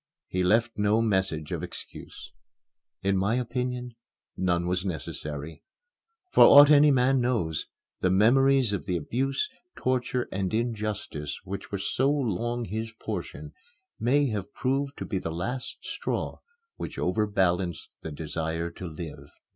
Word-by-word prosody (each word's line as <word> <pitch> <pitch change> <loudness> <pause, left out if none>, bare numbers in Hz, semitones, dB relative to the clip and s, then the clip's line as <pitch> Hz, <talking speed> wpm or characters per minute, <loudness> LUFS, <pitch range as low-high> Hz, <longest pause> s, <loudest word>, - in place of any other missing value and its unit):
He 90 0 -1
left 115 +4 +2
no 105 +2 +3
message 95 -8 0
of - - -2
excuse. - - -9 0.7
In 100 0 +2
my 100 +4 +2
opinion, 125 0 -2 0.4
none 85 -2 +1
was 90 +1 0
necessary. 75 -3 -5 0.7
For - - +7
aught 145 +1 +9
any 150 0 +7
man 130 -1 +3
knows, 110 -11 0 0.3
the 90 - +2
memories 125 +4 +4
of 100 - -3
the 90 -2 +1
abuse, 135 - -1 0.3
torture, 125 -1 0
and 95 +2 -1
injustice 105 -10 -3
which 95 +1 -6
were 100 - -1
so 130 +7 +1
long 120 -3 -1
his 110 +3 -4
portion - - -6 0.5
may 140 +5 +3
have 105 -4 -4
proved 140 +2 -1
to - - -4
be 95 - -2
the 85 - -4
last 120 +11 -4
straw - - -3 0.4
which - - -6
overbalanced 90 -4 0
the 80 - -6
desire 80 +2 -3
to 90 +1 -7
live. 80 -1 -8
105 Hz, 140 wpm, -27 LUFS, 90-125 Hz, 0.7 s, aught